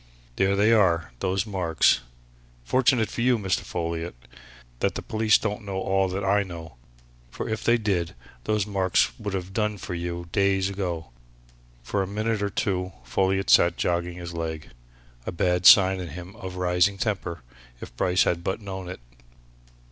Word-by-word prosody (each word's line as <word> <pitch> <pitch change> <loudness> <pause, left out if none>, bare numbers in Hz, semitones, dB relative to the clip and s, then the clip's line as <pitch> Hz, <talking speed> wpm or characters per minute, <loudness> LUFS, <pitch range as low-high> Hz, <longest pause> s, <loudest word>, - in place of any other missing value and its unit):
There 95 +1 +2
they 105 +3 +4
are, 85 -7 +3
those 95 +2 0
marks! 90 - +2 0.6
Fortunate 125 - +2
for - - -3
you, 125 0 +3
Mr. 95 -4 0
Folliot, 85 -2 -4 0.6
that - - 0
the - - -5
police 110 -1 +3
don't 105 0 -3
know 100 -1 -5
all 95 0 +1
that 95 +2 -3
I 100 +1 +3
know, 85 -8 -8 0.5
for - - -5
if 110 0 -3
they 120 0 +4
did, 95 -7 -1 0.3
those 105 -2 +1
marks 95 -11 +1
would 100 -2 -3
have 95 0 -5
done 105 0 0
for 90 - -6
you 85 0 -4
days 100 -1 +2
ago!" 85 -7 -4 0.7
For 100 - -1
a 95 - -2
minute 110 +2 -1
or 100 - 0
two 95 -2 -2
Folliot 95 +9 0
sat 85 0 +5
joggling 85 0 -1
his 85 -1 -7
leg 80 -2 -5 0.6
a - - -1
bad 90 +1 +2
sign 95 -1 +8
in 90 - -5
him 90 +4 -9
of 95 -1 -7
rising 90 +2 +2
temper 95 - -3 0.4
if - - -10
Bryce 90 +7 +2
had 85 -1 -1
but 95 - -2
known 95 -3 -7
it. 90 - -8
95 Hz, 170 wpm, -25 LUFS, 85-100 Hz, 0.7 s, sign